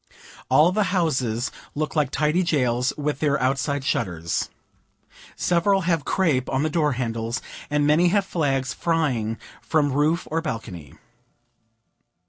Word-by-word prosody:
All 150 +7 +5
the 210 +2 +1
houses 130 -8 0 0.2
look 155 +2 -2
like 150 -4 +2
tidy 150 +5 +1
jails, 125 -7 +1
with 145 -1 -2
their 145 -2 +1
outside 140 +2 0
shutters. 85 -10 -1 0.9
Several 190 +3 +2
have 165 -4 0
crape 150 -10 +1
on 135 +1 0
the 155 - 0
door 150 -3 +1
handles, 115 -1 -2 0.3
and 145 0 +1
many 155 +4 +4
have 200 +2 +2
flags 135 -7 -1
flying 130 -10 0 0.2
from 145 -4 +1
roof 155 +5 +1
or 165 +1 0
balcony. 100 - -6
145 Hz, 130 wpm, -24 LUFS, 125-165 Hz, 0.9 s, All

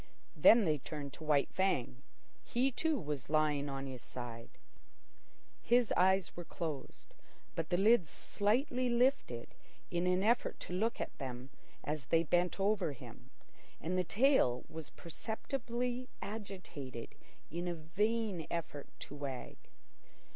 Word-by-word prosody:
Then 230 -2 +7
they 155 -3 +2
turned 145 0 -6
to - - -9
White 150 -2 +2
Fang. 140 -10 0 0.4
He, 255 +3 +1
too, 315 +4 +1
was 145 -5 -4
lying 150 -2 +2
on 135 0 -3
his 130 -3 -6
side. 120 -1 -7 1.1
His 240 -1 +4
eyes 190 0 +3
were 175 - -5
closed, 160 -4 -6 0.4
but 160 -1 -3
the 175 - +2
lids 200 -4 +5
slightly 245 - +1
lifted 240 - +1 0.4
in 175 +1 +1
an 180 +1 +3
effort 235 +3 +2
to - - -6
look 225 +6 0
at - - -4
them 130 -1 -5 0.3
as 150 -2 -3
they 165 0 +4
bent 175 +3 +2
over 195 -6 +2
him, 135 - -12 0.5
and 175 +4 -2
the 185 - +2
tail 205 - +4
was 160 -2 -7
perceptibly 245 - -3
agitated 180 - -6 0.4
in 175 +2 -2
a 175 - -1
vain 195 +2 0
effort 155 -4 -4
to - - -7
wag. 140 -3 -5
175 Hz, 135 wpm, -35 LUFS, 145-220 Hz, 1.1 s, Then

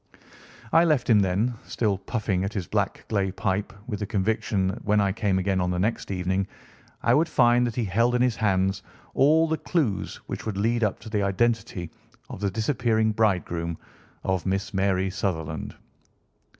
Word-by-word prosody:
I 165 +1 +7
left 155 -7 +2
him 105 - +6
then, 100 +6 +1
still 105 -4 0
puffing 100 -3 -1
at 100 +2 -3
his 95 -4 -2
black - - -2
clay 100 -3 0
pipe, 100 +1 -1
with 105 -5 -4
the 105 - -3
conviction 100 -1 0
that 95 - -6
when 105 0 +3
I 100 -1 +2
came 100 -2 0
again 95 0 +1
on 90 - 0
the 90 - -1
next 105 +6 -1
evening 95 0 -1 0.6
I - - +4
would 160 +2 +3
find 120 -4 +4
that 115 - -4
he 120 - 0
held 115 +6 +2
in 125 - +2
his 125 -3 +2
hands 95 -2 +1 0.3
all 160 +4 +4
the 160 0 -1
clues 145 - -1
which - - -5
would 105 -3 -3
lead 115 +3 +1
up 105 - +1
to 110 - -9
the 105 -2 +1
identity 100 -3 0 0.4
of - - -7
the 100 -1 0
disappearing 110 0 +1
bridegroom 90 -6 0 0.5
of 95 -2 0
Miss 95 +2 -1
Mary 95 -1 +1
Sutherland. 80 -6 -3
100 Hz, 180 wpm, -25 LUFS, 95-115 Hz, 0.6 s, I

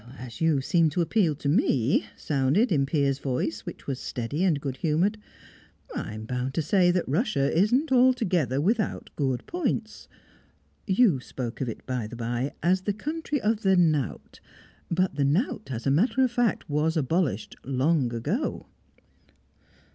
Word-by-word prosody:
"As 125 +1 -9
you 160 -4 +3
seem 165 +3 +3
to 160 +4 -1
appeal 170 -3 +2
to 140 - -5
me," 140 -4 +2
sounded 150 - +1
in 140 -4 +2
Piers' 140 -2 +1
voice, 135 +3 -3
which - - -8
was 135 -2 -3
steady 135 +7 -3
and 170 -7 +2
good 135 -2 -4
humoured, 175 +8 +1 0.7
"I'm 110 0 -5
bound 125 +3 -3
to 165 - 0
say 180 +3 +3
that 175 0 +1
Russia 145 - 0
isn't 245 - +2
altogether 220 - +3
without 215 +7 -1
good 130 -4 -1
points. 255 -10 -3 0.8
You 190 - +4
spoke 125 -1 -6
of 130 - -1
it, 110 - -8
by 125 -4 -3
the 120 - -9
bye, 120 +3 -2
as 185 +3 +3
the 205 +2 -1
country 300 +6 -3
of 215 +1 +1
the 190 -3 +3
knout; 155 -6 0 0.5
but 180 -3 0
the 145 - +2
knout, 190 - 0
as 120 -3 -5
a 135 - +3
matter 230 - +3
of 255 - +2
fact, 240 -3 0
was 155 +3 0
abolished 145 - -1
long 135 0 +1
ago." 145 - -2
155 Hz, 160 wpm, -26 LUFS, 135-200 Hz, 0.8 s, You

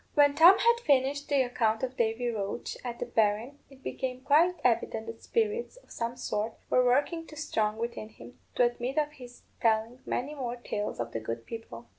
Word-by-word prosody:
When 285 -1 +6
Tom 345 +6 +8
had 470 0 +4
finished 280 - +2
the 280 -2 +4
account 225 -2 0
of 260 0 -2
Davy 235 +1 0
Roche 205 0 -3
and 240 -1 -4
the - - -3
berrin, 225 +6 0
it 270 -1 -18
became 255 -1 -4
quite 330 +7 +4
evident 225 -2 +1
that 230 0 -8
spirits, 455 +2 -1
of - - -20
some 235 +1 -3
sort, 220 -2 -2 0.2
were 255 - +5
working 290 +7 +1
too 305 - -11
strong 220 -8 -1
within 230 -1 -4
him 120 - -14 0.2
to - - +4
admit 245 +3 -1
of 300 -1 +1
his 250 -4 -13 0.2
telling 225 +2 +1
many 275 +5 -2
more 250 -4 -4
tales 210 -3 -4
of 115 0 -3
the 115 - -3
good 115 +1 -5
people. 120 - -8
245 Hz, 195 wpm, -29 LUFS, 225-285 Hz, 0.2 s, Tom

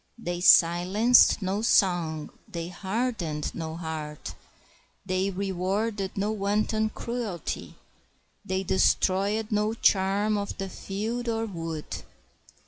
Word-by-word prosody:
They 175 -6 -4
silenced 190 +7 +5
no 195 +3 -1
song; 175 -8 +2 0.2
they 170 0 -5
hardened 190 -5 -3
no 160 -1 -5
heart; 155 -3 -6 0.7
they 185 +1 0
rewarded 195 +2 -2
no 205 +2 0
wanton 215 +1 0
cruelty; 225 - -5 0.7
they 190 +1 -2
destroyed 200 +3 +1
no 210 +1 +1
charm 205 +1 +2
of 200 - -5
the 195 0 -4
field 225 +6 -4
or 225 0 -1
wood. 165 -6 -5
195 Hz, 105 wpm, -27 LUFS, 175-215 Hz, 0.7 s, silenced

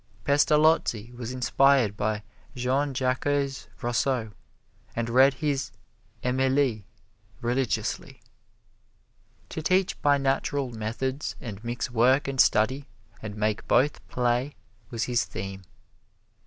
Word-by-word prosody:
Pestalozzi 145 -6 +3
was 120 -1 -6
inspired 130 -3 +3
by 105 0 -1 0.3
Jean 130 +3 0
Jacques 130 -1 -1 0.6
Rousseau, 120 -1 0 0.6
and 115 0 -2
read 130 +2 +5
his 145 -1 -1 0.5
"Emile" 130 -2 +1 0.6
religiously. 120 -2 -2 1.3
To 160 - -5
teach 185 +3 +1
by 145 -1 +4
natural 135 -1 0
methods 120 +6 -3
and 110 -5 -8
mix 120 +1 -3
work 125 +5 +3
and 135 -1 +3
study, 130 +6 +2 0.3
and 105 -2 -6
make 105 0 -1
both 145 +3 +3
play, 125 +3 0 0.3
was 115 -3 -2
his 120 -1 +1
theme. 95 0 -6
125 Hz, 105 wpm, -26 LUFS, 115-135 Hz, 1.3 s, read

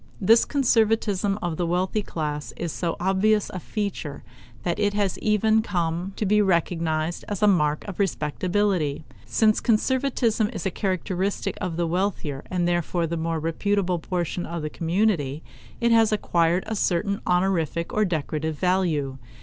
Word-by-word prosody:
This 225 +4 +5
conservatism 220 -6 +2
of 170 -2 -2
the 175 - 0
wealthy 185 +5 0
class 150 -5 -4
is 170 -2 -3
so 170 -2 -2
obvious 195 +3 +2
a 185 - -5
feature 190 -7 -4 0.4
that 175 +1 -1
it 205 -1 +1
has 200 -3 0
even 215 +1 +3
come 175 -2 -2
to 215 - -2
be 210 +2 +4
recognized 170 -3 0
as 205 -1 -3
a - - +6
mark 150 -5 +2
of 200 -1 -7
respectability. 180 -2 0 0.2
Since 215 -1 +3
conservatism 235 -2 +1
is - - -5
a 190 - 0
characteristic 190 +1 -2
of 170 -2 -3
the 175 - +1
wealthier 170 -5 -2
and 175 -1 0
therefore 175 0 0
more 165 0 -1
reputable 180 +3 0
portion 175 0 -2
of 170 -2 -5
the 155 - -3
community, 165 -5 0 0.4
it 235 0 +2
has 225 -1 +5
acquired 175 -4 +1
a 220 - -3
certain 200 +1 0
honorific 180 -3 0
or 215 - +2
decorative 160 -3 -2
value. 165 -8 0
180 Hz, 150 wpm, -25 LUFS, 165-205 Hz, 0.4 s, a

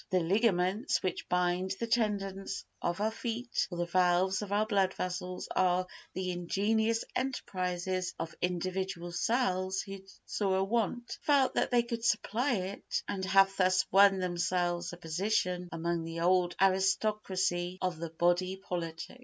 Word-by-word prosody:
The 185 - +3
ligaments 195 - +1
which 185 - -3
bind 180 +1 +1
the 230 - -1
tendons 200 -4 -1 0.2
of 175 +2 -1
our 215 +1 +1
feet 235 +2 -2
or 175 - -6
the 175 - 0
valves 180 +2 +2
of 205 -1 -6
our 210 +1 +2
blood 195 -3 +1
vessels 180 0 -4
are 185 0 +3 0.3
the 185 -1 -2
ingenious 220 +6 0
enterprises 185 -7 -2
of 165 0 -5
individual 180 0 -2
cells 190 -3 0
who 195 0 -7 0.3
saw 195 -2 0
a 190 - +2
want, 235 +3 -1
felt 280 -3 +3
that - - +1
they 240 -1 +3
could 235 -1 -4
supply 235 +3 +1
it, 190 0 -3
and 190 -1 -3
have 195 0 +4
thus 185 0 +3
won 195 0 +7
themselves 175 -1 -1
a 175 - -9
position 180 +1 -1
among 165 0 -2
the 165 0 -5
old 180 0 +3
aristocracy 190 -2 +1
of 180 -3 -2
the 165 0 -4
body 175 +3 +1
politic. 170 +2 -5
185 Hz, 150 wpm, -31 LUFS, 180-205 Hz, 0.3 s, won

